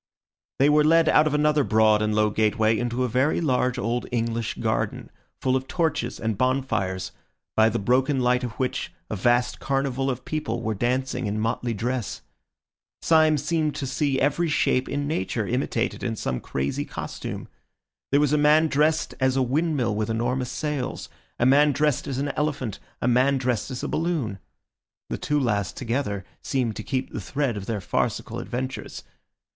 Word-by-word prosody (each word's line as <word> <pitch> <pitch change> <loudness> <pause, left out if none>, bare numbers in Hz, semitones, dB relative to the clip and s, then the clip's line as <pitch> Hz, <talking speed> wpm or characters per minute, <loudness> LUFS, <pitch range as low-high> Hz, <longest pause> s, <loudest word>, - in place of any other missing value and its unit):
They 135 - +4
were 150 0 +5
led 165 +1 +5
out 155 - +5
of 150 - 0
another 150 0 +3
broad 110 -2 +4
and 105 0 0
low 105 0 +3
gateway 110 +1 +2
into 120 +2 -1
a - - +1
very 130 +6 +1
large 125 -5 +1
old 120 0 -1
English 115 -1 -1
garden, - - -2 0.3
full 130 0 +1
of 130 0 -2
torches 160 -8 -1
and 110 -3 -2
bonfires, 130 -8 0 0.4
by 110 0 +5
the 115 - -1
broken 130 +6 +2
light 125 0 +2
of 120 -3 -3
which 130 +2 -2 0.2
a - - -1
vast 120 +4 +2
carnival 135 -1 -1
of 130 -1 -4
people 120 -7 -3
were 110 - 0
dancing 125 +2 -1
in 105 +1 -2
motley 115 +1 -1
dress. 120 +1 -3 0.8
Syme 155 -1 +5
seemed 155 +1 0
to 140 - -3
see 135 0 0
every 150 +5 +1
shape 130 -3 +1
in 145 0 -2
Nature 110 -5 -1
imitated 120 0 -1
in 115 - -2
some 65 - -2
crazy 70 +1 -2
costume. - - -6 0.6
There 140 - +4
was 150 -1 +2
a 150 - +3
man 155 +2 +5
dressed 155 +2 +2
as 130 0 +2
a 130 - +3
windmill 135 -3 0
with 105 0 -1
enormous 120 +3 -1
sails, 150 -4 -3 0.3
a 120 - +2
man 145 +3 +5
dressed 145 -1 +1
as 135 - -3
an 140 +1 -1
elephant, 145 -7 -2 0.2
a - - +2
man 130 +3 +3
dressed 125 -2 -1
as 125 -2 -5
a - - -1
balloon; 155 - -1 0.7
the - - -2
two 150 0 0
last, 100 -8 -1
together, 115 -6 -2 0.2
seemed 120 -5 -1
to - - -3
keep 130 +1 -2
the - - -4
thread 135 +4 -1
of 100 -2 -6
their 110 -3 -1
farcical - - -2
adventures. 130 +2 -5
130 Hz, 175 wpm, -25 LUFS, 115-145 Hz, 0.8 s, were